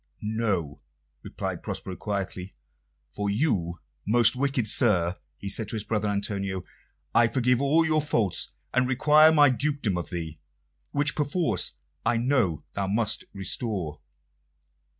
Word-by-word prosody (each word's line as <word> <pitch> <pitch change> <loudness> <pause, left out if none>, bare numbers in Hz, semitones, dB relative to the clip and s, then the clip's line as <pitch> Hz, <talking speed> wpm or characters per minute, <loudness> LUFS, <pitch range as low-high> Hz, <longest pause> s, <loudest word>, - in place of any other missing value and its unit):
"No," 105 -9 -2 0.4
replied - - -5
Prospero 95 - -5
quietly. 95 -2 -5 0.6
"For 105 0 -2
you, 100 - -1 0.3
most 115 +2 +4
wicked 135 -3 0
sir," 95 -7 +4 0.2
he 100 - -8
said 105 +2 +1
to - - -3
his 110 - -3
brother 105 -1 -1
Antonio, 100 -2 -2 0.5
"I 115 0 +5
forgive 125 +1 +1
all 155 +4 +3
your 155 -1 +2
faults, 115 - 0 0.2
and 125 0 +2
require 150 +5 +5
my 145 -3 +5
dukedom 130 -8 0
of 85 - -6
thee, 80 -4 -6 0.5
which 145 -1 +2
perforce 145 - 0 0.3
I 120 - +1
know 115 - +1
thou 100 -1 -2
must 105 +2 0
restore." 95 -5 -3
110 Hz, 130 wpm, -26 LUFS, 95-130 Hz, 0.6 s, I